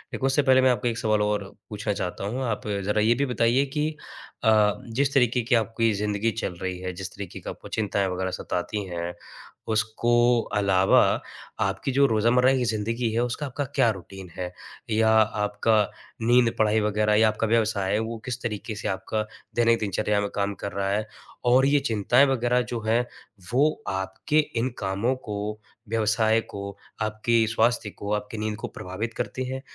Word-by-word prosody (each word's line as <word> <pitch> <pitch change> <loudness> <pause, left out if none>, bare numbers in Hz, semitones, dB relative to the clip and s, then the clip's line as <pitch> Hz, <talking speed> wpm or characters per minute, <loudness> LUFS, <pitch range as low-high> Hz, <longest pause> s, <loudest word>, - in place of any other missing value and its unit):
एक - - -7
उससे 135 +2 +3
पहले 130 -2 +5
मैं 130 - +5
आपको 120 -1 -1
एक 115 -1 -1
सवाल 110 -2 +1
और 105 -1 0 0.3
पूछना 105 0 -2
चाहता 90 -1 -4
हूँ। 125 +6 -2
आप 110 -3 -3 0.2
ज़रा 105 +2 +1
ये 115 +3 +4
भी 140 +3 +1
बताइए 125 +1 +2
कि 150 +3 -1 0.5
अ, 105 -2 +5
जिस 135 +4 0
तरीके 125 -2 +3
की 120 +1 +2
आपकी 115 0 +1
ज़िंदगी 105 +2 0
चल 110 -4 -3
रही 95 -1 -3
है, 90 0 -4
जिस 90 +1 -6
तरीके 100 -3 -7
की - - -7
आपको - - -9
चिंताएँ 100 -2 0
वग़ैरह 95 0 -2
सताती 100 +4 -3
हैं। 85 -1 -4 0.6
उसको 120 +2 +2 0.2
अलावा 95 -1 +4 0.6
आपकी 135 - -2
जो 140 +2 +4
रोज़मर्रा 120 +3 +3
की 125 -2 0
ज़िंदगी 115 +2 -1
है 115 - 0
उसका 125 +5 -3
आपका 140 +1 -3
क्या 115 - +4
रूटीन 95 -1 -10
है? 90 -1 -4 0.4
या 110 0 +3
आपका 110 0 +3 0.4
नींद, 120 +1 +4
पढ़ाई 110 0 +3
वग़ैरह 105 0 +1
या 110 +1 +5
आपका 110 +1 0
व्यवसाय 110 -4 +1
है 105 - +2
वो 115 +1 -3
किस 125 -1 -4
तरीके 110 -1 -4
से 105 - -4
आपका 95 +3 -2 0.3
दैनिक 115 -1 +3
दिनचर्या 105 0 0
में 100 - -2
काम 100 0 0
कर 100 - -3
रहा 100 0 -2
है? 105 +2 -1 0.4
और 125 +2 +5
ये 145 +1 +4
चिंताएँ 120 +1 +3
वग़ैरह 125 -1 +2
जो 120 - -1
हैं 115 +2 +3 0.5
वो 145 +5 +2
आपके 95 +11 -1 0.2
इन 125 +3 0
कामों 100 +6 0
को, 105 -3 -5 0.3
व्यवसाय 110 0 +2
को, 100 -2 -8 0.2
आपके 110 +2 +1
स्वास्थ्य 115 -1 +2
को, 100 0 -7
आपकी 105 +1 -3
नींद 105 0 -2
को - - -5
प्रभावित 105 +6 -5
करती 130 +3 -3
हैं? 130 0 -4
110 Hz, 180 wpm, -25 LUFS, 105-120 Hz, 0.6 s, पहले